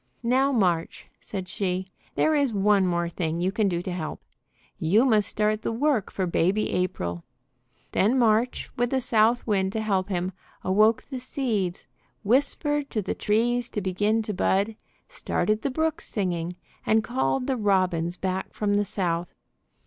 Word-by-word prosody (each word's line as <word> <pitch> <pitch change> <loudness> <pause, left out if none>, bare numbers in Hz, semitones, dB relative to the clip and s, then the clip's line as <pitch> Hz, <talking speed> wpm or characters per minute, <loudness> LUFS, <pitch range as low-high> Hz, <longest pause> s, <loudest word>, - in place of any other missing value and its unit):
"Now 260 +4 +3
March," 180 -9 0
said 190 -3 -6
she, 185 -1 -2 0.3
"there 315 - +3
is 285 -4 +2
one 200 -2 +3
more 170 -1 0
thing 170 -1 -2
you 180 +2 +1
can 210 +1 +1
do 175 -1 -2
to 185 - -4
help. 165 -3 -4 0.6
You 200 +10 +4
must 215 -5 +3
start 215 0 0
the - - -2
work 250 -2 +1
for 190 - -1
Baby 185 +4 +1
April." 85 - -2 0.7
Then 225 +7 +2
March, 235 0 +2
with 245 0 +1
the 265 - +1
South 230 -1 +2
Wind 195 -3 +1
to 220 - -1
help 200 -3 0
him, 180 -1 -1 0.3
awoke 215 +4 +3
the 260 - -3
seeds, 225 -8 -2 0.4
whispered 285 +5 +1
to 215 - -2
the - - -2
trees 240 +3 +1
to - - -3
begin 205 +4 +1
to 215 - -3
bud, 200 +3 +1 0.3
started 220 - -1
the 280 - -1
brooks 315 +3 -1
singing, 175 -4 -2 0.3
and 220 0 +3
called 250 +2 0
the 265 - 0
robins 185 -5 +1
back 190 0 -3
from 205 -1 0
the 205 0 +2
South. 175 -3 -2
210 Hz, 165 wpm, -26 LUFS, 185-235 Hz, 0.7 s, You